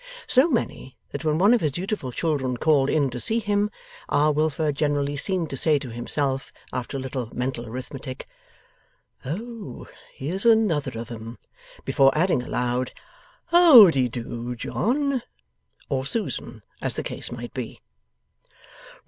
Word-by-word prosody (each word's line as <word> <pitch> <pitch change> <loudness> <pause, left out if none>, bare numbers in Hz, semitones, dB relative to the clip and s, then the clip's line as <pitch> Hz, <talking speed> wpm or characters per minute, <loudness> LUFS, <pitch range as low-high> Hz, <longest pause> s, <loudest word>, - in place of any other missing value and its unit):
So 260 +5 +5
many, 225 - -2
that 145 - -5
when 155 -1 +1
one 200 +7 +5
of 245 - +3
his 150 - +1
dutiful 175 -3 -3
children 135 -4 -1
called 145 -1 +3
in 145 -4 +1
to 125 - -5
see 225 - +2
him, 205 -2 +1 0.4
R. 150 +1 +3
Wilfer 155 0 0
generally 145 0 0
seemed 170 +2 -1
to 135 - -3
say 155 +2 +3
to 135 -4 -6
himself, 135 +3 -2 0.2
after 125 +2 -3
a - - -4
little 130 -3 -4
mental 125 -1 -3
arithmetic, 130 +2 -7 1.0
'Oh! 215 - -6 0.3
here's 170 +8 -3
another 210 - +2
of 115 +1 -7
'em!' 115 0 -8 0.5
before 135 0 +4
adding 170 -5 +2
aloud, 125 0 -2 0.6
'How 315 - +9
de 130 -4 +1
do, 120 0 -5
John,' 260 - 0 0.7
or 135 -2 -1
Susan, 130 - -2 0.2
as - - 0
the - - -3
case - - -4
might 120 0 -7
be. 125 -4 -6
145 Hz, 145 wpm, -24 LUFS, 125-190 Hz, 1.0 s, How